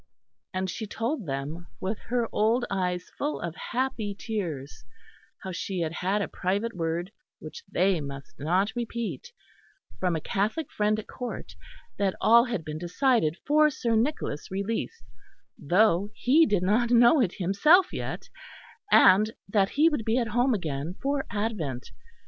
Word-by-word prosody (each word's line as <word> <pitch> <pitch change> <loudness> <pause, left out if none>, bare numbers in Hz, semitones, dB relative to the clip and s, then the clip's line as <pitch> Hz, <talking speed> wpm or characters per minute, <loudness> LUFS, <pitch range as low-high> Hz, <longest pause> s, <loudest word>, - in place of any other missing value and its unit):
And 185 0 -2
she 215 +4 -5
told 230 - -3
them, 145 +5 -4
with 200 +3 -3
her 240 -1 0
old 230 +3 +2
eyes 180 -2 -2
full 295 +2 -1
of 170 -1 -5
happy 240 -5 -2
tears, 170 - -5 0.6
how 190 - -5
she 180 +1 -3
had 160 -2 -1
had 195 +4 0
a - - -3
private 200 +5 -2
word, 170 +2 -2 0.3
which 470 - -10
they 185 -2 +2
must 140 -1 -9
not 180 +8 +1
repeat, 235 - -4 0.7
from 180 -2 +1
a - - -1
Catholic 210 - -2
friend 210 0 +1
at 215 - -5
Court, 250 -2 -7 0.5
that 195 -2 +1
all 235 +2 +6
had 230 -10 -3
been 155 0 -5
decided 175 - +1
for 305 +1 +5
Sir 235 -5 -1
Nicholas' 225 - -1
release, 205 - -3 0.5
though 190 +4 +2
he 300 +6 +4
did 205 -5 +1
not 220 +5 +2
know 240 +4 +6
it 195 -7 +1
himself 250 - +4
yet, - - -5 0.6
and 210 +3 +6 0.2
that 195 -1 +2
he 305 +3 +3
would 295 -8 0
be 225 +2 +1
at 235 -3 0
home 245 +3 +2
again 155 -2 -4
for 275 0 -1
Advent. 205 - -3
205 Hz, 155 wpm, -27 LUFS, 175-240 Hz, 0.7 s, all